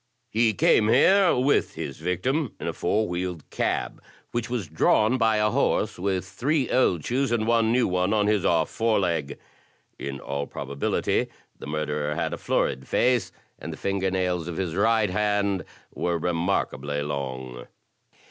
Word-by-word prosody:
He 110 -1 +2
came 105 +3 +4
here 185 - +5
with 130 +3 +1
his 70 - -6
victim 130 - -1
in - - -6
a - - -2
four 110 +1 0
wheeled 90 -2 -4
cab, - - -2 0.3
which 120 -1 -2
was 120 -8 -2
drawn 110 +10 +2
by 110 -2 +3
a 105 0 +2
horse - - 0
with 95 0 -1
three 130 +8 -1
old 90 - +2
shoes 130 +1 0
and 115 -2 +1
one 115 -1 +3
new 125 +1 +3
one 90 +1 0
on 105 -1 +2
his 105 -3 +2
off 80 -2 +2
fore 115 -1 +1
leg. 85 -6 -1 0.6
In 70 -1 -5
all 70 +1 -4
probability 70 +1 -1 0.3
the - - -8
murderer 75 0 -2
had - - -2
a - - -5
florid 65 0 -1
face, 125 -1 +2 0.3
and - - -6
the - - -7
finger 95 -1 -1
nails 90 -2 -1
of 85 - -5
his 90 -4 -2
right 110 0 +2
hand 100 -1 0 0.3
were 85 -1 -1
remarkably 80 -4 -1
long." 65 -3 -5
95 Hz, 165 wpm, -25 LUFS, 80-115 Hz, 0.6 s, here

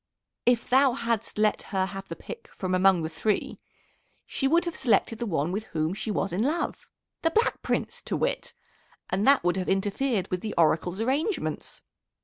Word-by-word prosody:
If 245 -1 +3
thou 265 0 +5
hadst 230 -4 -2
let 215 0 +2
her 190 -2 +1
have 195 0 -7
the - - -6
pick 465 - -9
from 185 -1 -4
among 185 -2 +4
the - - -1
three, 195 +6 -1 0.7
she 270 - -1
would 335 +5 +3
have 345 - -3
selected 230 -3 +2
the 235 - -2
one 160 -3 0
with 210 +3 -3
whom 160 -1 -1
she 215 +2 -5
was 195 -2 -1
in 190 - 0
love 305 +8 -1 0.3
the 330 - +3
Black 455 +7 +1
Prince - - -2
to - - -1
wit, - - -2 0.6
and 195 +5 +1
that 275 0 +6
would 175 +1 +1
have 185 - -2
interfered 200 +2 0
with 180 -1 -1
the 215 - -4
Oracle's 170 +3 +2
arrangements. 285 - -1
215 Hz, 185 wpm, -27 LUFS, 185-265 Hz, 0.7 s, that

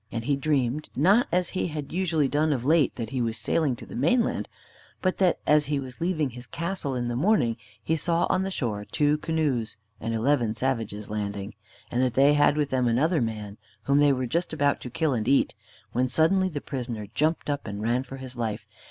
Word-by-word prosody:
And 115 0 -4
he 140 - +2
dreamed, 140 0 0
not 195 - +4
as 180 +1 +1
he 185 - -1
had 150 -3 -6
usually 165 -5 +1
done 150 +3 +1
of 125 -3 -3
late, 155 -2 +3
that 115 0 -5
he 130 -2 -1
was 115 -1 -1
sailing 150 -6 +1
to - - -11
the - - -10
mainland, 170 - +1 0.5
but 185 -1 -1
that 185 -3 +3
as 150 -1 +4
he 145 -1 0
was 130 +3 -9
leaving 160 -6 0
his 125 +1 -10
castle 170 -5 -3
in 120 -1 -1
the 120 - -2
morning 135 - +2 0.3
he 160 - +1
saw 170 +2 +1
on - - +1
the 190 - -1
shore 115 - -2
two 150 +6 +1
canoes 145 -10 -1 0.2
and 115 +2 -2
eleven 115 -1 +1
savages 115 -4 -2
landing, 100 -1 -4 0.4
and 120 - +1
that 125 -2 +1
they 140 +2 +6
had 145 0 +4
with 145 -2 0
them 130 -2 +2
another 150 +7 +2
man, 105 -3 -4 0.2
whom 140 +1 +3
they 145 -1 +5
were 130 -1 0
just 170 +9 -1
about 145 -2 +1
to 125 - -6
kill 155 +3 0
and 110 -2 -2
eat, 135 +1 +3 0.4
when 125 +1 +1
suddenly 175 +8 +3
the 145 -5 -5
prisoner 120 -6 -5
jumped 155 +2 0
up 145 -3 -2
and 100 0 -5
ran 120 +3 +1
for 135 +1 -9
his 130 -1 -9
life. 110 -3 -3
135 Hz, 215 wpm, -26 LUFS, 120-155 Hz, 0.5 s, they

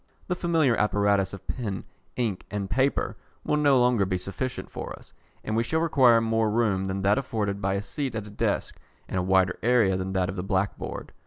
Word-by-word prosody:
The 180 - -1
familiar 165 -8 +2
apparatus 100 -2 +2
of 100 - -10
pen, 105 -7 -3 0.3
ink, 110 -7 -1
and 100 -2 -3
paper 135 +2 +1 0.3
will 150 - +1
no 145 -3 +4
longer 125 -4 +3
be 95 -1 0
sufficient 100 +8 -5
for - - -6
us, - - -18 0.3
and 110 - -2
we 115 - +3
shall 160 +7 0
require 130 -8 +5
more 115 -1 +1
room 105 -4 +1
than 95 0 -3
that 100 +6 +3
afforded 105 -6 -2
by 95 0 0
a 100 - -2
seat 135 +2 -4
at 110 -2 -3
a 105 - -10
desk, 105 - -1 0.3
and 95 - -2
a - - +1
wider 95 0 +2
area 115 -5 +3
than 95 0 -3
that 95 -1 +1
of 95 +1 -5
the 90 - -2
black 95 0 0
board. - - -7
105 Hz, 215 wpm, -26 LUFS, 95-125 Hz, 0.3 s, require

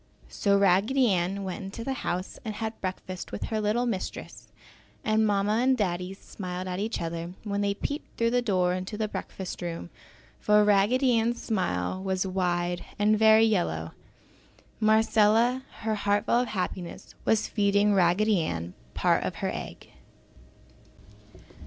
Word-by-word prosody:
So 200 -1 +2
Raggedy 200 +7 +3
Ann 185 +2 0
went 190 0 -5
into 195 +4 -6
the 270 - -2
house 180 +2 -3
and 215 -2 -4
had 220 +1 -5
breakfast 185 -1 -5
with - - -4
her 220 -1 -1
little 215 +4 +1
mistress 210 -6 -5 0.6
and 220 0 +2
Mamma 205 +2 +1
and 260 +1 +3
Daddy 180 -2 -2
smiled 185 -2 -6
at 180 0 -3
each 220 +3 -2
other 170 +1 -4
when 205 -1 -2
they 200 0 0
peeped 285 +8 -5
through 230 0 +2
the 245 0 +2
door 185 -6 +1
into 185 +3 -4
the 215 0 -1
breakfast 190 -3 -6
room, 170 0 -5 0.5
for 210 0 +4
Raggedy 230 +5 +3
Ann's 235 +1 0
smile 185 - -1
was 190 0 -1
wide 175 -2 -1
and 210 +1 +3
very 220 0 +7
yellow. 85 - 0 0.9
Marcella, 220 +3 +4 0.2
her 220 0 0
heart 205 0 +1
full 240 - +3
of 250 - 0
happiness, 180 -3 -5
was 220 -1 +2
feeding 205 0 +2
Raggedy 190 +2 +3
Ann 85 - -3 0.2
part - - +2
of - - -3
her - - -2
egg. - - -8
205 Hz, 150 wpm, -27 LUFS, 185-220 Hz, 0.9 s, very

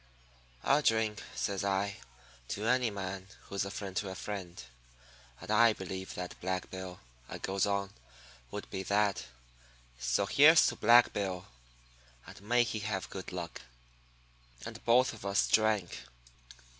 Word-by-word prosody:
"'I'll 145 +2 +4
drink,' 110 -5 +1
says 100 -1 -2
I, 100 0 0 0.5
'to 105 - -4
any 125 0 +3
man 95 -2 -5 0.2
who's 100 0 -3
a - - -4
friend 100 -1 -6
to 100 - -1
a 95 - -6
friend. 95 -4 -6 0.8
And - - -6
I 115 +1 +6
believe 95 -1 -6
that 90 -1 -6
Black 95 0 -3
Bill,' 95 -1 -7 0.3
I - - -5
goes 95 +1 0
on, 100 -1 -1 0.6
'would - - -6
be 95 - -3
that. 100 -5 +1 0.7
So 60 +8 +1
here's 155 +9 +7
to - - -5
Black 120 +1 +6
Bill, 95 -2 -3 0.8
and - - -12
may 120 +4 +3
he 110 -1 -3
have 105 -3 -3
good 95 -1 -7
luck.' 85 -2 -6 1.0
"And - - -8
both 125 +2 +4
of 110 - -11
us 100 0 +2
drank. 110 -5 +2
100 Hz, 145 wpm, -32 LUFS, 95-110 Hz, 1.0 s, here's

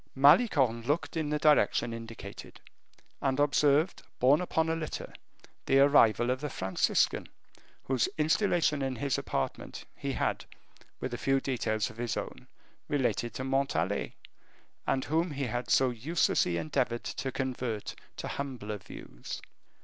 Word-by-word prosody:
Malicorne 135 - +5
looked 145 +10 -1
in 155 -2 -1
the 150 - +1
direction 150 -5 +3
indicated, 115 0 -9 0.6
and 135 0 0
observed 145 +3 +3 0.2
borne 140 +6 +4
upon 160 -2 0
a 160 - +1
litter, 160 -2 -5 0.5
the 135 - +4
arrival 125 -4 +5
of 130 +1 -2
the 150 - -3
Franciscan, 95 -6 +1 0.6
whose 130 -2 +1
installation 160 -1 +2
in 135 -1 -1
his 135 +3 -1
apartment - - -4
he - - -3
had, - - -1 0.6
with 130 - -4
a 120 - -4
few 135 0 +2
details 120 -4 -1
of 110 - -17
his 120 -1 -2
own, - - -6 0.4
related 130 -4 0
to 130 - -3
Montalais, 130 -9 0 0.7
and 130 - +1
whom 165 +6 +1
he 140 -2 -3
had 120 0 -3
so 130 -1 +4
uselessly 120 - +1
endeavored 95 +8 -1
to 135 - -4
convert 125 -5 -3 0.2
to - - -4
humbler 120 -7 -4
views. - - -8
135 Hz, 140 wpm, -30 LUFS, 120-145 Hz, 0.7 s, Malicorne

